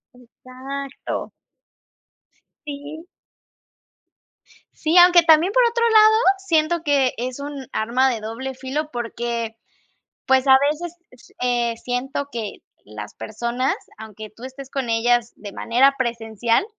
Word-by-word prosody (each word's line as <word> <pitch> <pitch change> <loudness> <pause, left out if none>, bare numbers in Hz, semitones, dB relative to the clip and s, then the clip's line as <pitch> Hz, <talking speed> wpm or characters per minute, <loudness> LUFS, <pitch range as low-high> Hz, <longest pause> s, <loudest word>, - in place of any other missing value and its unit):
Exacto. 260 +3 -7 1.4
Sí. 290 +3 -8 1.7
Sí, 320 +3 +1
aunque 350 0 +8
también, 330 +4 +4
por - - +5
otro 465 0 +1
lado, 435 -1 +6 0.2
siento 335 -3 +1
que 280 -4 +2
es 250 +3 -4
un 280 -2 -7
arma 250 +4 +2
de 230 -4 -3
doble 245 +5 -5
filo 275 +4 -4
porque, 235 -1 -4 0.7
pues, 265 0 +3
a 265 0 +8
veces 340 +3 -5 0.2
s 250 - -20
eh, 240 -2 0
siento 255 +4 -3
que 225 -3 -5 0.3
las 105 0 -9
personas, 235 +4 -2 0.2
aunque 215 -1 -10
tú 230 +3 -13
estés 265 +1 -9
con 270 -3 -3
ellas 235 +1 +1
de 205 -2 -9
manera 265 +4 +3
presencial, 230 - 0
260 Hz, 120 wpm, -22 LUFS, 235-290 Hz, 1.7 s, aunque